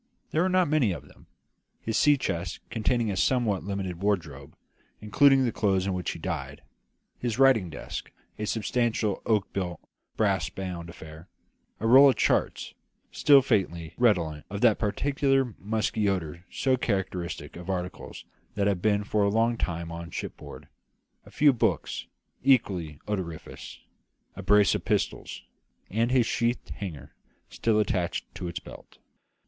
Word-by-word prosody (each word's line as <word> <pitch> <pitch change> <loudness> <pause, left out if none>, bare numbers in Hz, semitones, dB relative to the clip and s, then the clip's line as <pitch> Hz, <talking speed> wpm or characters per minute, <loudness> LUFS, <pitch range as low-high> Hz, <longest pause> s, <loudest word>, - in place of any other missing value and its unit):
There 160 - +2
were 185 - +2
not 185 -1 +3
many 145 -10 +2
of - - -9
them: - - -20 0.5
his 110 - -3
sea 145 +4 +5
chest, 85 -8 -3
containing 115 0 0
a - - -2
somewhat 110 -3 +1
limited 95 -3 -4
wardrobe, 80 -8 -2 0.4
including 135 +6 +4
the 120 - 0
clothes 95 -4 +1
in 100 - -1
which 90 -2 -3
he - - -4
died; 65 +2 -5 0.6
his 120 -3 -2
writing 130 -9 +4
desk, - - -7 0.3
a 105 - -2
substantial 110 -1 0
oak 105 -3 +1
built, 90 -3 -3 0.4
brass 100 -3 +1
bound 90 -3 -6
affair; 80 0 -11 0.5
a 110 - -4
roll 135 +5 +8
of 130 - +2
charts, - - 0 0.4
still 140 -3 +6
faintly 85 - -1
redolent 85 -11 +1
of 100 0 -5
that 115 -4 +4
peculiar 135 +3 +1
musty 110 0 0
odour 85 -2 -3
so 130 -1 +1
characteristic 95 -6 -3
of 90 +2 -9
articles 90 -1 -5 0.3
that 100 -1 +1
have 100 -3 +1
been 105 0 +2
for 105 0 0
a 100 - +3
long 115 +3 +2
time 85 -6 -3
on 85 0 -7
shipboard; - - -8 0.6
a - - -12
few 145 -2 +4
books, 120 - -1 0.4
equally 95 - +2
odoriferous; 90 -6 -6 0.5
a - - -7
brace 105 -1 +4
of - - -2
pistols; - - -2 0.5
and 115 +4 +1
his 125 -2 +3
sheathed 120 +2 -1
hanger, 75 -9 -7 0.4
still 110 -2 +1
attached 90 -4 -1
to 90 - -5
its 85 +1 -4
belt. - - -13
100 Hz, 150 wpm, -27 LUFS, 90-120 Hz, 0.6 s, roll